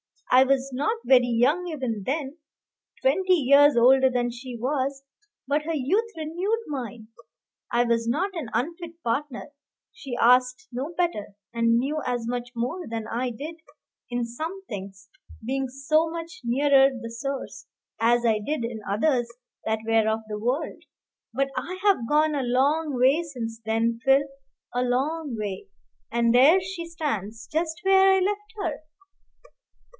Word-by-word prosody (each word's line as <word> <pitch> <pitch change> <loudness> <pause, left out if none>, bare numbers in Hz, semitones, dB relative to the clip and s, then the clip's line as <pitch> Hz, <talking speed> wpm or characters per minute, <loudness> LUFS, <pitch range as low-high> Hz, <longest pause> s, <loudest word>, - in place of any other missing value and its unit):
I 255 +1 +7
was 270 0 +1
not 430 - 0
very 250 -2 +5
young 260 +10 +2
even 255 - -3
then, 285 +1 -3 0.7
twenty 380 -7 +3
years 285 -1 +5
older 260 +2 +6
than 245 -1 -1
she 245 0 -8
was; 270 +2 -2 0.4
but 290 +3 0
her 330 +2 -2
youth 385 - +1
renewed 355 +9 -2
mine. 245 -6 -6 0.6
I 240 0 +3
was 230 -1 0
not 380 +12 0
an 315 -10 -5
unfit 335 +7 -4
partner; 265 +3 -3 0.4
she 275 - -7
asked 250 +7 +3
no 260 +6 -4
better, 335 - -1 0.2
and 230 0 +3
knew 290 +5 -1
as 240 -2 -2
much 245 0 -3
more 255 +10 -3
than 225 -1 -4
I 245 +2 -1
did 295 +8 -7 0.5
in 245 -1 -1
some 320 +11 -6
things, 195 -1 -8 0.4
being 265 +2 -1
so 295 +5 +1
much 335 0 -7
nearer 270 +2 +5
the 245 -3 -7
source, 275 +3 -5 0.3
as 240 +1 +3
I 220 -2 +3
did 285 +4 -3
in 230 -1 -4
others 240 +3 +1 0.4
that 220 0 0
were 225 -1 +3
of 220 0 0
the 210 0 -4
world. 250 +8 -2 0.5
But 275 +3 0
I 365 +1 -4
have 390 - +3
gone 305 +1 +3
a 285 - 0
long 280 +5 +1
way 265 +6 +4
since 235 -8 -6
then, 225 +1 0
Phil, 270 +1 +5 0.5
a 245 - 0
long 270 +3 -1
way; 205 - -5 0.4
and 235 0 +2
there 280 +9 +7
she 370 -2 -6
stands, 225 - -4
just 320 0 -2
where 385 0 +6
I 385 - +4
left 415 +2 -2
her." 315 -5 -3
265 Hz, 155 wpm, -25 LUFS, 235-315 Hz, 0.7 s, I